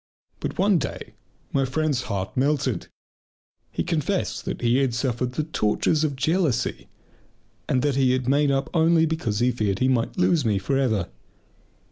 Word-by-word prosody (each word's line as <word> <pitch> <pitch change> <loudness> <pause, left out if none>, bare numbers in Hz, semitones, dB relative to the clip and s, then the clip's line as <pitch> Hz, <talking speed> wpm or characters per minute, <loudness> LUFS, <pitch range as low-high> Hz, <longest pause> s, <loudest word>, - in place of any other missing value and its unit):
But - - -4
one 195 -2 +3
day - - -6 0.4
my 135 - +2
friend's 140 0 0
heart 95 -1 -3
melted. 135 - 0 0.8
He - - -2
confessed - - -1
that - - -4
he 120 +1 +3
had 135 -4 +1
suffered 125 -1 -1
the 155 - -1
tortures 150 +2 0
of 145 -3 0
jealousy, 145 -4 0 0.8
and 130 - +1
that 145 -2 +1
he 130 -1 +3
made 140 +3 +2
up 135 0 0
only 165 -1 +4
because 155 -10 -2
he 120 +3 +2
feared 105 -5 -1
he 130 - +1
might 125 -3 0
lose 175 -4 +3
me 105 -4 +1
for 95 +8 -1
ever. 110 - 0
130 Hz, 160 wpm, -24 LUFS, 120-150 Hz, 0.8 s, only